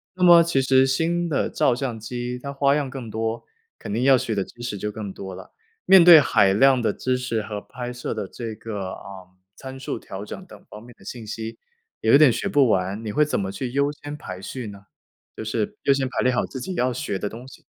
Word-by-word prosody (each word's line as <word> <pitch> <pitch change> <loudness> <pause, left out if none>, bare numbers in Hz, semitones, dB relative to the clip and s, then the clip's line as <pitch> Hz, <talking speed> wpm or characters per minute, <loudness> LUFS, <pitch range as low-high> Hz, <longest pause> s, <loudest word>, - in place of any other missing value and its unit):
那 180 - -2
么 170 -1 +8
其 165 -5 +1
实 130 0 +4
新 170 +6 0
的 145 - 0
照 125 - +2
相 125 -3 -4
机 120 +2 -5
它 140 +2 -6
花 140 0 +2
样 145 -3 -1
更 130 -3 -7
多， 110 +1 -3 0.4
肯 - - -7
定 115 +3 0
要 135 0 +6
学 115 -2 -2
的 100 - 0
知 120 - -15
识 120 -4 -4
就 105 +2 -3
更 105 -2 -6
多 95 0 -8
了。 95 - -12 0.3
面 190 -2 +8
对 170 -3 +11
海 100 -8 +3
量 130 +5 +5
的 110 -3 0
知 130 0 -1
识 125 -3 -2
和 105 -1 -5
拍 125 +2 -7
摄 125 - -4
的 100 - -4
这 115 +2 -6
个， 100 -4 -6
呃， 95 -2 -11 0.3
参 130 0 -9
数 130 - -4
调 95 +1 -8
整 185 - -8
等 - - -15
方 105 +1 -11
面 120 +1 -14
的 - - -17
信 115 +1 -7
息， 115 +1 -6 0.4
也 110 - +2
有 140 - +9
点 150 -3 +6
学 115 - -2
不 140 -4 +4
完。 95 +2 0
你 105 - -3
会 150 +8 +3
怎 150 - -1
么 95 -1 -3
去 120 +5 -5
优 140 +2 +1
先 145 0 -8
排 95 -10 -8
序 125 +3 -6
呢？ 100 0 -11 0.5
就 110 - -6
是 110 -1 -2
优 140 - +4
先 135 -1 0
排 - - -4
列 125 - +2
好 125 - 0
自 130 - -8
己 185 +9 -5
要 130 -6 +1
学 105 -5 -3
的 105 - -3
东 120 +4 -10
西。 135 - -15
125 Hz, 265 characters per minute, -23 LUFS, 105-135 Hz, 0.5 s, 对